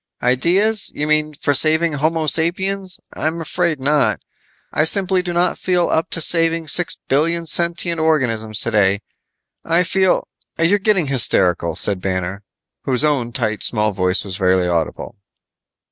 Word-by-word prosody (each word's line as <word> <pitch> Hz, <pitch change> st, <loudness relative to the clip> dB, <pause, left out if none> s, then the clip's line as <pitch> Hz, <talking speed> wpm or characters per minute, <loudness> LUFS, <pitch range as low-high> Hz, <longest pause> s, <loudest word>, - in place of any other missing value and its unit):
"Ideas? 180 Hz, -, +1 dB
You 150 Hz, -, -2 dB
mean 155 Hz, 0 st, 0 dB
for 145 Hz, -, -1 dB
saving 160 Hz, +3 st, +2 dB
Homo 155 Hz, +2 st, -1 dB
sapiens? 185 Hz, +5 st, -1 dB
I'm 160 Hz, +2 st, -3 dB
afraid 165 Hz, -1 st, -2 dB
not. 145 Hz, +2 st, +1 dB, 0.5 s
I 155 Hz, -, +2 dB
simply 190 Hz, +2 st, +2 dB
do 180 Hz, -1 st, -5 dB
not 175 Hz, +1 st, 0 dB
feel 180 Hz, -2 st, 0 dB
up 160 Hz, +3 st, 0 dB
to 165 Hz, -, +1 dB
saving 165 Hz, -1 st, +2 dB
six 175 Hz, +3 st, +2 dB
billion 165 Hz, +5 st, 0 dB
sentient 170 Hz, +1 st, -1 dB
organisms 115 Hz, -9 st, +1 dB
today. 100 Hz, -3 st, +1 dB, 0.6 s
I 165 Hz, +2 st, +2 dB
feel 190 Hz, +1 st, +1 dB, 0.2 s
" -, -, -46 dB
"You're 170 Hz, +5 st, +3 dB
getting 195 Hz, -4 st, +1 dB
hysterical," 90 Hz, -, +1 dB
said 95 Hz, +2 st, 0 dB
Banner, 95 Hz, +1 st, -3 dB, 0.4 s
whose 130 Hz, +2 st, +1 dB
own 135 Hz, -6 st, 0 dB
tight, 110 Hz, -3 st, -2 dB
small 105 Hz, -2 st, 0 dB
voice 90 Hz, 0 st, 0 dB
was 95 Hz, 0 st, -6 dB
barely 90 Hz, -1 st, +2 dB
audible. 85 Hz, -3 st, -3 dB
155 Hz, 145 wpm, -18 LUFS, 110-170 Hz, 0.6 s, You're